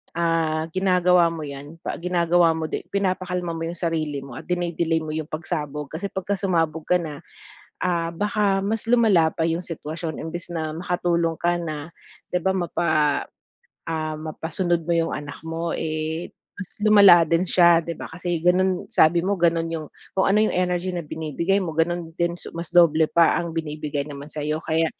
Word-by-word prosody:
ah, 165 -2 +1
ginagawa 180 -2 +4
mo 165 -2 -4
yan, 145 +2 -8
pa - - -4
ginagawa 170 -1 +3
mo 160 -1 -4
di - - -4
pinapakalma 185 -3 -1
mo 165 0 -3
yung 175 - -5
sarili 155 -5 -2
mo 135 - -10
at - - -13
dine-delay 170 -2 0
mo 155 - -5
yung 155 -1 -3
pagsabog 150 -3 -4
kasi 180 +6 -4
pagka 195 +1 -3
sumabog 165 -5 0
ka 180 - +4
na, 150 -3 -6 0.6
ah, 170 -2 0
baka 205 0 +1
mas 220 +2 -2
lumala 215 -9 +4
pa 165 - -2
yung 165 +2 -2
sitwasyon 160 0 -5
imbes 170 +2 -6
na 155 -1 -2
makatulong 170 -2 0
ka 175 0 +2
na 155 -1 -5 0.4
'di 180 - +1
ba? 190 0 +1
Mapa 175 -1 -1 1.0
ah, 155 -1 -2
mapasunod 165 +2 -2
mo 170 - +1
yung 165 -1 +1
anak 145 0 -7
mo, 165 +1 -3
eh, 160 +1 -3 0.3
mas 200 -3 -7 0.2
lumala 200 -5 +8
din 170 +2 +3
siya 170 -2 +5
'di 170 - -3
ba? - - -6
Kasi 175 0 -3
gano'n 185 0 +2
sabi 170 +2 +5
mo 200 +1 +1
gano'n 165 -1 +2
yung 155 -2 -4 0.3
kung 190 - +3
ano 210 - +4
yung - - 0
energy 180 0 0
na 175 - -2
binibigay 160 +5 -1
mo, 165 -4 -3
gano'n 170 0 0
din 170 0 -1
su - - -8
mas 170 -1 -5
doble 160 -2 +5
pa 170 -1 +4
ang 170 -1 -3
binibigay 150 -2 -3
naman 145 +1 -9
sa'yo, 150 +1 -2
kaya 160 0 +1
170 Hz, 180 wpm, -23 LUFS, 160-180 Hz, 1.0 s, lumala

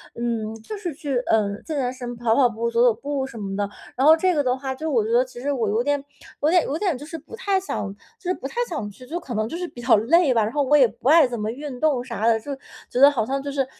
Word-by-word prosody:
嗯 230 -2 -2
就 420 - -7
是 355 -6 -4
去， 275 -2 -3
呃， 215 -2 +3
健 310 -3 -5
健 250 -2 0
身、 245 -2 -6
跑 230 -1 +2
跑 255 -3 +5
步、 235 +1 -2
走 235 0 +1
走 240 -2 +5
步 275 +3 -3
什 235 -4 -10
么 195 -1 -4
的， 205 0 -1 0.3
然 265 - +1
后 320 +1 +8
这 365 0 +2
个 290 - +2
的 255 0 +1
话 265 0 -4
就 315 +3 -3
我 225 -5 +2
觉 225 - -3
得 245 +2 +5
其 255 -1 -11
实 285 +2 -1
我 225 -6 0
有 220 +3 +1
点 285 +1 0 0.4
有 305 - +4
点 355 0 +5
有 295 - -2
点 355 -8 0
就 290 - -9
是 325 +1 -7
不 320 - -16
太 395 -4 +1
想 205 - -4 0.3
就 360 - -5
是 - - +3
不 270 - -10
太 275 - -6
想 285 - -4
去， 250 +5 -14
就 340 - -3
可 260 -7 -7
能 215 0 0
就 330 - -6
是 355 +1 -3
比 240 - -11
较 235 -2 +5
累 285 +5 +4
吧。 225 -2 +3
然 215 - -2
后 290 - +1
我 290 +3 +3
也 260 -4 +6
不 245 - -7
爱 320 -2 +7
怎 240 -3 -5
么 210 +1 -2
运 270 -1 -7
动 285 -6 +1
啥 235 -3 -4
的， 225 -1 +4
就 280 +4 -6 0.3
觉 250 - -2
得 280 +1 +9
好 225 -6 -1
像 270 +2 -2
就 280 0 -5
是， 275 -2 0
260 Hz, 325 characters per minute, -23 LUFS, 235-295 Hz, 0.4 s, 得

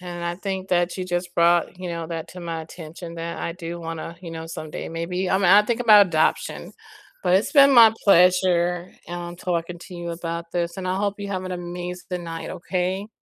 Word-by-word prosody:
and 175 -1 -7
I 170 0 -2
think 190 0 -4
that 175 -1 +1
you 185 - -2
just 175 0 -3
brought, 170 +1 +3
you 185 - -4
know, 170 -1 -4
that 165 -2 -5
to 180 - -10
my 165 -1 -4
attention, 165 +1 -9
that 170 0 -5
I 170 - -3
do 170 -1 -7
wanna, 165 0 -6
you 170 -3 -8
know, 165 0 -6
someday, 155 -2 -6
maybe, 180 +3 -2
I - - +4
mean 195 - +2
I'll 205 +3 +7
think 235 +2 -1
about 210 -4 +7
adoption, 160 -2 0 0.5
but 180 -1 +3
it's 200 - -1
been 280 -2 +7
my 230 -3 +8
pleasure, 180 -1 +3 0.2
um, 175 0 -6
talking 175 -1 -3
to 180 - -11
you 170 -1 -5
about 170 0 -5
this, 170 -1 -2
and 190 -1 -5
I 185 +1 0
hope 200 0 -1
you 200 0 -5
have 185 -1 -3
an 185 - -4
amazing 180 0 -5
night, 165 0 -6
okay? 185 +3 -3
175 Hz, 215 wpm, -23 LUFS, 170-185 Hz, 0.5 s, my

